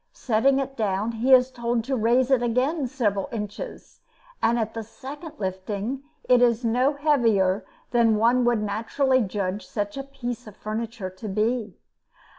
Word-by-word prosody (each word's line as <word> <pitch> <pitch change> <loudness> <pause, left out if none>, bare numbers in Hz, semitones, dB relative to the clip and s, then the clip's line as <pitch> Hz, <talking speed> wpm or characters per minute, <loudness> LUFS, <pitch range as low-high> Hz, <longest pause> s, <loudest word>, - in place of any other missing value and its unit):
Setting 260 +3 +2
it 270 0 -2
down, 210 -1 0
he 230 +4 0
is 255 0 +6
told 235 -2 -1
to 265 +3 -1
raise 245 +3 +2
it 260 -2 +4
again 255 +5 +1
several 210 -7 -1
inches; 215 - -7 0.4
and 235 +1 +3
at 225 -1 -2
the 225 - -4
second 285 +8 -9
lifting 200 +6 -3 0.2
it 250 -1 +4
is 240 0 +3
no 250 +5 +2
heavier 230 -10 +2 0.3
than 230 -2 +4
one 240 +3 +3
would 235 -3 +2
naturally 240 +6 +1
judge 200 -1 -2
such 205 +2 -3
a 275 - -3
piece 245 -4 -6
of 210 - -12
furniture 215 -2 -4
to 185 +4 -8
be. 215 +3 -1
235 Hz, 160 wpm, -25 LUFS, 215-260 Hz, 0.4 s, is